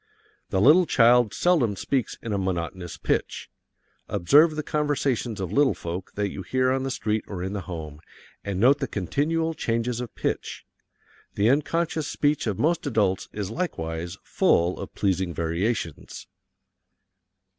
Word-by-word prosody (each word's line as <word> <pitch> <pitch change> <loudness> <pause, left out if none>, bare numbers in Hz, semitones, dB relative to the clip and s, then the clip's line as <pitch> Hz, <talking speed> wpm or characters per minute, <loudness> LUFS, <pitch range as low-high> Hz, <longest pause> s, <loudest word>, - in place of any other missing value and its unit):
The 95 - 0
little 160 - +6
child 120 -3 +5
seldom 140 - +2
speaks 130 +5 -2
in 115 - -3
a - - 0
monotonous 90 -1 -3
pitch. - - -2 0.6
Observe 145 - +4
the 155 - -3
conversations 140 -7 -1
of 95 -2 -3
little 140 +3 +3
folk 85 +2 -6
that 105 -1 -1
you 95 - -6
hear 130 +7 +1
on 130 0 0
the 135 - -2
street 110 -3 -1
or 90 -3 -5
in 95 +2 -3
the 100 - -3
home, 80 -3 -7 0.4
and 100 -2 -3
note 135 +6 +5
the 135 - -2
continual 155 - -1
changes 115 -3 -1
of 120 - -7
pitch. - - -3 0.7
The 105 +4 +3
unconscious 155 +2 0
speech 145 -3 0
of 100 -4 -1
most 160 0 +1
adults 105 -7 0
is 105 -1 -4
likewise 85 - -4
full 85 +2 +2
of - - -6
pleasing 95 -3 0
variations. 85 +1 -3
110 Hz, 150 wpm, -25 LUFS, 95-140 Hz, 0.7 s, little